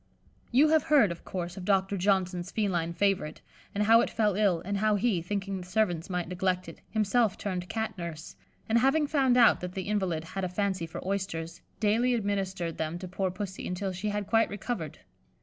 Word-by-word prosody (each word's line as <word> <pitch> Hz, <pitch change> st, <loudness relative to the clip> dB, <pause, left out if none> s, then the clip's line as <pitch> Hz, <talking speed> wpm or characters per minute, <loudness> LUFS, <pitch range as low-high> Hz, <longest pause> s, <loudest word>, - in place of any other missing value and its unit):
You 280 Hz, +5 st, +5 dB
have 315 Hz, 0 st, +5 dB
heard, 275 Hz, -11 st, +5 dB
of 170 Hz, -, -8 dB
course, 175 Hz, -1 st, -5 dB
of 190 Hz, -, -6 dB
Doctor 195 Hz, 0 st, +2 dB
Johnson's 185 Hz, -2 st, 0 dB
feline 180 Hz, -7 st, -1 dB
favourite, 185 Hz, -3 st, 0 dB, 0.4 s
and 205 Hz, -, +2 dB
how 225 Hz, +2 st, +6 dB
it -, -, 0 dB
fell 215 Hz, -2 st, +1 dB
ill, 200 Hz, -5 st, +2 dB
and 200 Hz, +1 st, -1 dB
how 215 Hz, +1 st, +2 dB
he, 205 Hz, -4 st, +1 dB
thinking 195 Hz, +1 st, -3 dB
the 180 Hz, -, -10 dB
servants 180 Hz, -4 st, 0 dB
might 180 Hz, -2 st, -2 dB
neglect 180 Hz, 0 st, -1 dB
it, 165 Hz, -, -11 dB
himself 220 Hz, 0 st, +1 dB
turned 180 Hz, -3 st, -4 dB
Cat 220 Hz, -1 st, -2 dB
nurse, 165 Hz, -2 st, -6 dB, 0.3 s
and 225 Hz, +1 st, +3 dB
having 270 Hz, +5 st, +3 dB
found 270 Hz, -4 st, +2 dB
out 235 Hz, -2 st, +6 dB
that 180 Hz, 0 st, -6 dB
the 190 Hz, -, -3 dB
invalid 190 Hz, -6 st, -1 dB
had 190 Hz, +4 st, -5 dB
a 185 Hz, -, -1 dB
fancy 190 Hz, -2 st, -1 dB
for 165 Hz, -, -7 dB
oysters, 175 Hz, -4 st, -3 dB, 0.2 s
daily 230 Hz, +4 st, +2 dB
administered 195 Hz, -5 st, -2 dB
them 160 Hz, +2 st, -2 dB
to 185 Hz, +1 st, -7 dB
poor 190 Hz, +1 st, -1 dB
Pussy 190 Hz, +1 st, -5 dB
until 190 Hz, +2 st, -2 dB
she 190 Hz, +4 st, -3 dB
had 205 Hz, 0 st, -2 dB
quite 225 Hz, +2 st, +3 dB
recovered. 200 Hz, -, -4 dB
195 Hz, 200 wpm, -29 LUFS, 180-215 Hz, 0.4 s, how